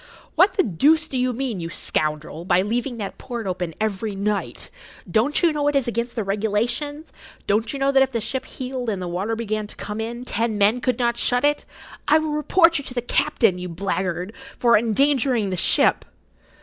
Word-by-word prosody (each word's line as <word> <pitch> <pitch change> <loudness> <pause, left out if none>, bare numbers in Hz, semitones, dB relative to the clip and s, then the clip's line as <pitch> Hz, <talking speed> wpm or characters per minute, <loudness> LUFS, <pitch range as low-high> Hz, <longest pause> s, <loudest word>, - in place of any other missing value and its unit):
"What 380 +1 +4
the 380 - +3
deuce 300 - +3
do 270 - -7
you 255 0 +1
mean, 245 -4 -3
you 165 -1 -5
scoundrel, 155 0 -3
by 180 +1 +3
leaving 240 +4 -2
that 200 -3 -6
port 240 -3 -5
open 180 -3 -3
every 215 -1 -2
night? 200 +1 -2 0.4
Don't 250 +10 +1
you 335 -2 +4
know 290 -1 0
it 290 - +1
is 275 -3 +2
against 235 +1 -2
the 225 - -1
regulations? 230 +9 -2 0.3
Don't 220 +2 +1
you 280 - -4
know 275 0 +2
that 270 -1 +4
if 265 0 +2
the 235 - -1
ship 260 +4 -3
heeled 255 -2 -4
and 200 -3 -2
the 180 - -4
water 190 +6 -2
began 215 -2 -3
to - - -8
come 210 +2 -5
in, 235 +2 -5
ten 225 -2 -1
men 210 +4 +3
could 250 -2 0
not 235 -1 0
shut 245 +3 +3
it? 295 0 +1 0.4
I 305 - +6
will 315 -1 -1
report 330 +2 +3
you - - -7
to 250 - -9
the 245 - 0
captain, 215 -5 +2
you 180 0 -5
blackguard, 185 +1 -3 0.2
for 235 -1 +4
endangering 235 -1 +2
the - - -1
ship!" 175 - +3
230 Hz, 205 wpm, -22 LUFS, 200-270 Hz, 0.4 s, I